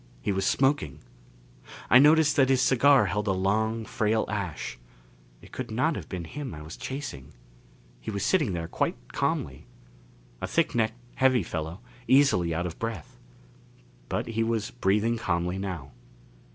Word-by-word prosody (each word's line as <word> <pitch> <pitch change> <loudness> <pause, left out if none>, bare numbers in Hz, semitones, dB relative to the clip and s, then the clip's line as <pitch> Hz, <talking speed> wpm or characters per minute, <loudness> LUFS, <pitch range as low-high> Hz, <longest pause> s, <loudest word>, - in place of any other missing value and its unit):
He - - -2
was 95 0 0
smoking. 135 - +1 0.9
I 120 - +7
noticed 150 +1 +5
that 135 -2 +4
his 135 -1 +4
cigar 130 -1 +5
held 105 +2 -2
a - - +3
long 110 +4 0
frail 110 0 0
ash. 100 -11 -4 0.6
It - - -15
could - - -5
not 140 +9 +1
have - - -7
been 90 -3 -4
him 130 - -6
I 75 - -9
was 80 +4 -9
chasing. 125 - -6 0.7
He - - -7
was 100 -2 -2
sitting 150 - +2
there 85 -1 -3
quite - - -1 0.2
calmly. - - -2 0.7
A - - -2
thick 165 -3 +1
necked, 115 -1 0 0.2
heavy 130 -5 +4
fellow, 80 +4 -5 0.3
easily 130 -11 +4
out 85 +2 -1
of 85 - -6
breath. 115 -2 -5 0.9
But - - -2
he 115 0 -1
was 115 -1 -1
breathing 110 +1 +1
calmly 90 -2 -1
now. 90 -8 -5
110 Hz, 155 wpm, -27 LUFS, 90-130 Hz, 0.9 s, I